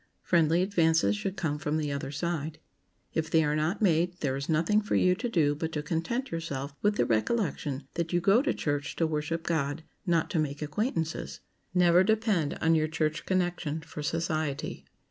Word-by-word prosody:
Friendly 170 Hz, 0 st, +3 dB
advances 160 Hz, -, +3 dB
should 190 Hz, -, -4 dB
come 155 Hz, -5 st, -1 dB
from 155 Hz, 0 st, -1 dB
the 150 Hz, -2 st, -1 dB
other 140 Hz, -1 st, -3 dB
side. 155 Hz, +1 st, -3 dB, 0.6 s
If 160 Hz, 0 st, -1 dB
they 160 Hz, 0 st, +4 dB
are 150 Hz, 0 st, +1 dB
not 165 Hz, +8 st, 0 dB
made, 175 Hz, -1 st, +2 dB
there 135 Hz, -3 st, 0 dB
is 140 Hz, +3 st, -5 dB
nothing 165 Hz, +7 st, +3 dB
for 210 Hz, -, -1 dB
you 180 Hz, -, +4 dB
to 235 Hz, +6 st, -3 dB
do 155 Hz, -9 st, +2 dB
but 160 Hz, +2 st, -3 dB
to 150 Hz, -, -2 dB
content 180 Hz, -, -2 dB
yourself 140 Hz, -4 st, -4 dB
with 210 Hz, 0 st, +2 dB
the -, -, +2 dB
recollection 145 Hz, -, -1 dB
that 170 Hz, -1 st, -2 dB
you 175 Hz, -, +2 dB
go 195 Hz, +7 st, +4 dB
to 285 Hz, 0 st, +1 dB
church 145 Hz, -1 st, -2 dB
to 165 Hz, -, +1 dB
worship 160 Hz, +1 st, -2 dB
God, 155 Hz, -2 st, -1 dB, 0.2 s
not 170 Hz, -2 st, +2 dB
to 165 Hz, -, +1 dB
make 145 Hz, -1 st, -2 dB
acquaintances. 160 Hz, -, -2 dB, 0.3 s
Never 180 Hz, 0 st, +6 dB
depend 210 Hz, -7 st, +1 dB
on 165 Hz, 0 st, +4 dB
your 155 Hz, -1 st, +2 dB
church 155 Hz, 0 st, -2 dB
connection 175 Hz, -4 st, -1 dB
for 155 Hz, -1 st, -8 dB
society. 155 Hz, -2 st, -2 dB
160 Hz, 185 wpm, -29 LUFS, 150-175 Hz, 0.6 s, Never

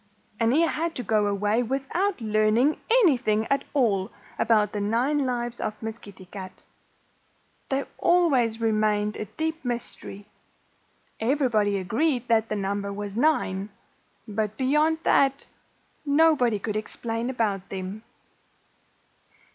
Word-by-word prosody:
And 230 Hz, 0 st, +3 dB
he 300 Hz, +6 st, +4 dB
had 330 Hz, 0 st, 0 dB
to 250 Hz, -, -4 dB
go 215 Hz, -3 st, +2 dB
away 205 Hz, +3 st, +1 dB
without 270 Hz, -, -1 dB
learning 215 Hz, +5 st, +2 dB
anything 260 Hz, -, +3 dB
at 275 Hz, -, +1 dB
all 210 Hz, -7 st, +2 dB, 0.3 s
about 215 Hz, -2 st, +3 dB
the 210 Hz, -, -3 dB
nine 255 Hz, +7 st, +1 dB
lives 240 Hz, -1 st, -3 dB
of 215 Hz, -, -4 dB
Miss 225 Hz, 0 st, -6 dB
Kitty 195 Hz, -2 st, -13 dB
Cat. 185 Hz, 0 st, -10 dB, 1.1 s
They 275 Hz, +1 st, 0 dB
always 270 Hz, -11 st, +3 dB
remained 215 Hz, -2 st, +1 dB
a 215 Hz, -, -4 dB
deep 320 Hz, -, -4 dB
mystery. 235 Hz, -4 st, -5 dB, 0.9 s
Everybody 225 Hz, -5 st, +1 dB
agreed 245 Hz, -, 0 dB
that 225 Hz, -1 st, +3 dB
the 215 Hz, -, -1 dB
number 200 Hz, 0 st, -2 dB
was 205 Hz, 0 st, -6 dB
nine. 215 Hz, -8 st, +1 dB, 0.6 s
But 215 Hz, 0 st, -2 dB
beyond 300 Hz, +5 st, +2 dB
that, 275 Hz, 0 st, +3 dB, 0.6 s
nobody 285 Hz, -6 st, +3 dB
could 210 Hz, +1 st, -4 dB
explain 225 Hz, +2 st, -3 dB
about 210 Hz, -7 st, -1 dB
them. 190 Hz, +2 st, -5 dB
225 Hz, 125 wpm, -25 LUFS, 210-275 Hz, 1.1 s, he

